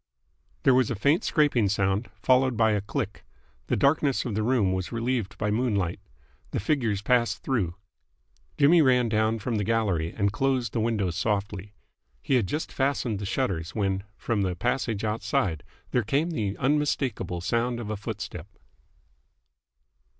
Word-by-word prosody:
There 135 - +5
was 125 -2 +3
a 120 - -1
faint 140 - +2
scraping 140 - +2
sound, 100 +2 0
followed 130 -2 +3
by 110 -1 +4
a 105 -1 +1
click. 100 - -4 0.4
The - - +1
darkness 140 +2 +2
of 120 - -3
the 110 - 0
room 110 -5 +2
was 95 -1 -3
relieved 115 -3 -2
by 105 -1 -1
moonlight. 105 -6 0 0.5
The - - -2
figures 110 -4 0
passed 120 +1 +1
through. 100 -11 -1 0.8
Jimmy 155 +4 +6
ran 125 -4 +3
down 110 +1 +1
from 115 +1 -2
the 105 - 0
gallery, 100 -7 0
and 100 -1 0
closed 130 -1 0
the 115 - 0
windows 105 -6 0
softly. 100 0 -2 0.4
He 95 - -2
had 120 -7 +3
just 150 - -3
fastened 130 -6 0
the 100 - -4
shutters, 95 -9 -2
when 95 -3 0
from 110 -3 -1
the 95 -2 0
passage 115 +1 -1
outside 105 -7 -1 0.3
there 125 - +2
came 140 +10 0
the 105 - -2
unmistakeable 135 - 0
sound 115 +7 -1
of 110 -2 -5
a - - -1
footstep. 105 -5 -6
110 Hz, 160 wpm, -26 LUFS, 100-125 Hz, 0.8 s, Jimmy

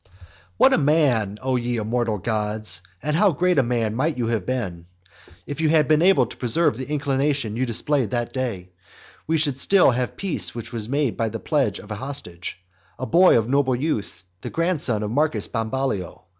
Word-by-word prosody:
XXXVI. 95 - -31 0.5
What - - +5
a - - +4
man, 135 -9 +2
O 130 0 0
ye 120 0 -2
immortal 115 0 -1
gods! 105 -2 -2 0.2
and 150 +2 0
how 200 +3 +4
great 180 +1 +2
a - - +6
man 120 -3 -1
might 145 +5 -1
you 120 - -1
have 110 -6 -2
been, 90 -10 -3 0.6
if 145 +2 -5
you 155 - +2
had 155 -3 +4
been 155 +2 +4
able 175 -8 +5
to - - -11
preserve 125 +3 +1
the 130 +3 -6
inclination 140 -5 0
you 130 +2 -1
displayed 125 +1 0
that 120 0 -2
day; 110 -9 -4 0.6
we 160 +1 +2
should 145 -4 0
still 190 -1 +5
have 125 0 -2
peace 120 - -3
which 120 +1 -7
was 110 -1 -5
made 140 -2 +1
then - - -14
by 115 -1 0
the 115 +1 -5
pledge 135 - 0
of 105 - -11
a - - -2
hostage, 95 -13 -6 0.4
a 130 - -4
boy 180 +3 +5
of 110 -1 0
noble 130 -1 +2
birth, 105 - -3 0.2
the - - -5
grandson 155 - 0
of 105 - -3
Marcus 150 +5 +1
Bambalio. 115 -5 -3
125 Hz, 200 wpm, -23 LUFS, 110-145 Hz, 0.6 s, a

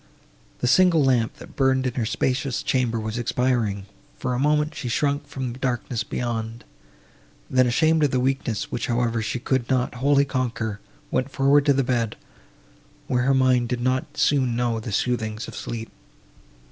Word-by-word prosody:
The - - +1
single 170 +3 +5
lamp, 125 -4 +2
that - - -13
burned 130 -1 +2
in 125 - -1
her 115 -3 -1
spacious 130 +2 -1
chamber, 120 -3 0
was 110 +2 -3
expiring; 120 -5 0 0.3
for 130 -1 -2
a 125 - -1
moment, 150 +2 +2
she 125 -4 -5
shrunk 145 +3 0
from 130 -3 -4
the 125 - -11
darkness 125 -2 -2
beyond; 115 -1 -4 0.8
and 130 - 0
then, 130 - +6
ashamed 160 +6 +3
of 145 - +4
the 130 - 0
weakness, 130 -4 -1
which, - - -2
however, 120 -1 0
she 110 +2 -2
could 125 0 -1
not 130 -2 +1
wholly 140 +2 +3
conquer, 120 -6 -2 0.3
went 130 +2 0
forward 140 +1 +3
to 140 - +6
the 135 0 +1
bed, 120 -3 -1 0.9
where 125 -1 0
her 135 0 +3
mind 130 -2 +3
did 125 -1 -1
not 130 +5 -1
soon 130 -5 +2
know 120 -1 0
the 110 0 -6
soothings 110 0 -1
of - - -9
sleep. 115 -1 -6
125 Hz, 175 wpm, -24 LUFS, 120-135 Hz, 0.9 s, then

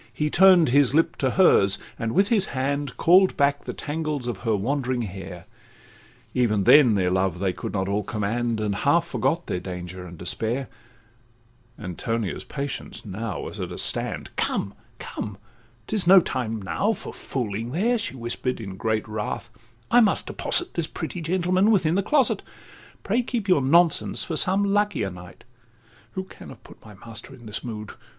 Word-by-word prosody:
He 150 0 -2
turn'd 185 -4 +6
his 140 +1 +4
lip 165 - +3
to 130 - +1
hers, 110 - +4 0.2
and 115 -1 -2
with 195 +3 +3
his 210 -5 +3
hand 140 0 -2
Call'd 185 +3 +5
back 140 0 +1
the - - -3
tangles 150 -3 -3
of 120 -5 -4
her 115 -3 0
wandering 125 +3 -1
hair; 90 -3 -8 0.9
Even 110 -5 +2
then 125 -2 +7
their 90 -2 +1
love 95 -1 +1
they 95 0 -1
could - - -6
not 95 -2 -1
all 100 +1 0
command, 110 +3 -2
And 105 -1 -1
half 165 +8 +2
forgot 135 +5 -1
their 90 - -2
danger 90 0 -7
and 85 0 -11
despair: 115 +9 -2 1.1
Antonia's 105 -1 -3
patience 140 -4 -6
now 105 +1 -4
was - - -7
at - - -4
a - - -6
stand— - - 0
'Come, 100 - -1 0.2
come, 105 -3 -6 0.5
'tis 205 -5 -2
no 190 +1 +9
time 115 -9 -3
now 195 - 0
for - - -8
fooling 115 -3 -4
there,' 220 - +1
She 205 - -3
whisper'd, 125 +1 -3
in 95 -4 -7
great 110 +1 -1
wrath—'I 115 - -2
must 215 - +2
deposit 355 +1 -1
This 170 -2 -1
pretty 165 +1 -5
gentleman 185 +4 +2
within 180 -7 +3
the 195 - +2
closet: 270 +6 +2 0.6
'Pray, 225 +5 +1
keep 240 -4 -3
your 180 -7 +4
nonsense 165 +5 +3
for 165 - -4
some 190 +5 +3
luckier 200 - +1
night— 90 0 -12 0.7
Who 190 - -3
can 190 - -13
have - - -13
put - - -16
my 105 -2 -13
master 115 +6 -11
in 120 -2 -16
this 110 +1 -5
mood? 105 -3 -6
125 Hz, 170 wpm, -24 LUFS, 105-170 Hz, 1.1 s, no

